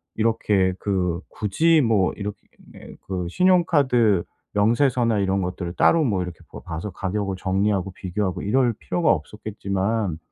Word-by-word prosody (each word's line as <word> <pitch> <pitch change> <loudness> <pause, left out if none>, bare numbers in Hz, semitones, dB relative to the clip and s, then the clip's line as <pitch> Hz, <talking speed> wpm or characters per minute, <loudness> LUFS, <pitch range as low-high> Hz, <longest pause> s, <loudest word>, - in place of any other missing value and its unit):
이렇게 105 -4 +1
그 90 -4 -1
굳이 155 +11 +2
뭐 110 -7 +2
이렇게 105 0 -5 0.7
그 90 -2 -3
신용카드 140 - +3 0.3
명세서나 115 +1 +2
이런 95 0 +1
것들을 90 -1 -4
따로 165 +9 +4
뭐 100 -9 0
이렇게 90 -2 -8
봐 - - -8
봐서 80 +6 -5
가격을 100 0 -3
정리하고 95 0 0
비교하고 95 0 -3
이럴 120 +3 +2
필요가 170 +9 0
없었겠지만 100 +1 -2
100 Hz, 315 characters per minute, -23 LUFS, 95-115 Hz, 0.7 s, 따로